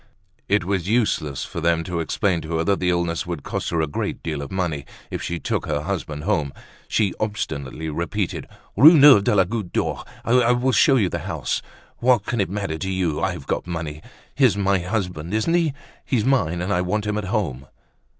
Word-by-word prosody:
It 105 -2 +3
was 95 -1 -1
useless 105 - 0
for 85 - -6
them 85 0 +2
to 85 0 -3
explain 85 +2 0
to 80 +1 -3
her 80 - +1
that 100 +2 +1
the 90 - +1
illness 85 -1 0
would 85 -5 -4
cost - - -3
her 85 -1 0
a - - +2
great 70 - -4
deal 75 -3 -3
of 70 - -7
money, 85 -7 -2 0.3
if - - -3
she 85 - -3
took - - -2
her 75 -1 -1
husband 75 -4 -4
home. 75 -4 0 0.3
She 100 -4 +1
obstinately 80 -8 -3
repeated: 85 +5 -3 0.3
"Rue 155 - +9
Neuve 140 -8 +8
de 105 - +2
la 95 - +6
Goutte 100 -1 -4
d'Or; - - -1 0.2
I 125 0 +4
will 125 +2 +1
show 135 +4 +5
you 110 -7 +3
the - - -3
house. - - -2 0.4
What 120 -4 +3
can 120 -2 0
it 95 - -1
matter 95 -5 -3
to 95 - -3
you? 90 -5 -1
I've 90 -7 -2
got - - -2
money. 80 -3 -5 0.3
He's 130 -7 +3
my 100 -1 +2
husband, 90 -2 -3
isn't 110 +10 +1
he? 170 -3 +3 0.3
He's 115 -5 0
mine, 90 -11 +1
and 100 +3 -1
I 90 - +2
want 105 +4 -1
him 105 0 -1
at 105 - -5
home." 85 - -2
95 Hz, 210 wpm, -22 LUFS, 80-105 Hz, 0.4 s, Rue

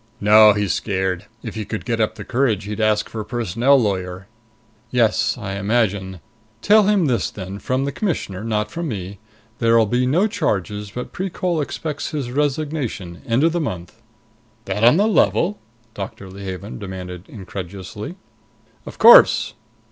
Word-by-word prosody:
"No. 105 +1 +7
He's 105 -3 0
scared. 95 -2 -2 0.2
If - - -6
he 110 - -4
could 110 +1 -6
get 115 -2 -1
up 110 0 0
the - - -8
courage, 120 -6 0
he'd 105 +2 -4
ask 105 0 +2
for 110 - -6
a - - -7
personnel 120 +4 +2
lawyer." 95 -4 -2 0.6
"Yes, 115 -1 +2
I 100 -5 -5
imagine. 100 -4 -1 0.4
Tell 210 -1 +5
him 205 -5 +3
this 120 -8 0
then 95 0 -7
from 130 +4 -1
the 140 - -2
Commissioner; 135 - -3
not 105 -1 -1
from 170 0 -4
me 100 -5 -6 0.4
there'll 115 -1 +4
be 125 +4 0
no 170 +10 +3
charges, 105 - -2
but 125 +4 -7
Precol 180 -3 -2
expects 145 0 -4
his 140 -5 -4
resignation, 140 - -2
end 120 +4 +2
of 165 - +4
the 175 +1 -1
month." 95 - -6 0.6
"That 100 +3 -2
on 120 +7 +6
the 205 - +3
level?" 205 -2 +2 0.3
Doctor 95 -1 -7
Leehaven 95 +1 -7
demanded 90 -2 -8
incredulously. 95 - -7 0.7
"Of - - -9
course." - - +7
110 Hz, 155 wpm, -21 LUFS, 100-135 Hz, 0.7 s, No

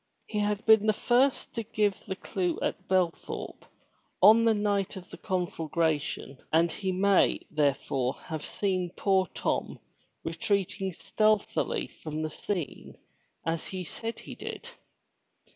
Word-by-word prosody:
He 210 - -3
had 210 0 0
been 220 -1 +6
the 215 - +5
first 250 +5 +2
to 230 - -2
give 210 -3 -1
the 190 - -2
clue 180 -2 -2
at - - -2
Belthorpe 185 -3 -1 0.5
on 225 +2 +7
the 225 - +5
night 205 -1 0
of 185 -1 -10
the - - -8
conflagration 165 -7 -1
and 165 +1 +4
he 190 -2 -2
may, 195 +1 +3
therefore, 140 -3 +1
have 155 -2 -4
seen 185 -3 -1
poor 190 -2 +3
Tom - - -1 0.5
retreating 195 -1 -1
stealthily 215 +4 +1
from 155 0 -6
the 155 - -3
scene 175 -3 -4 0.5
as 165 0 -1
he 185 -1 -4
said 225 +7 -5
he - - -8
did. - - -7
190 Hz, 135 wpm, -29 LUFS, 165-210 Hz, 0.5 s, on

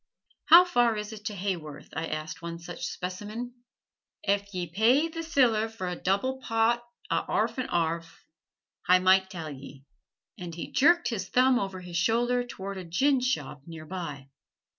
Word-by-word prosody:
"How 345 +1 +9
far 240 -10 +2
is 210 +1 -5
it 210 -1 -11
to 210 - -3
Haworth?" 180 -6 -4
I 160 +2 -2
asked 155 +2 -5
one 170 0 -5
such 170 0 -6
specimen. 210 +7 -5 0.7
"Ef 200 0 0
ye 180 -2 -3
pay 230 - +3
th' 330 0 -5
siller 240 -9 +2
for 220 -5 -5
a 180 - -2
double 200 +10 0
pot 230 +1 +1 0.3
a' - - +2
'arf - - 0
and 255 - -2
'arf. 165 0 -2 0.6
Hi 180 0 +7
might 190 +1 +4
tell 165 -5 -6
ye"; 140 0 -11 0.6
and 175 -2 -6
he 170 - -6
jerked 340 +6 +4
his 195 -6 -4
thumb 255 0 +4
over 190 -3 -4
his 175 -1 -5
shoulder 240 +6 +2
toward 200 -5 -7
a - - -6
ginshop 245 - 0
near 160 -2 -9
by. 150 -6 -6
195 Hz, 165 wpm, -28 LUFS, 170-240 Hz, 0.7 s, How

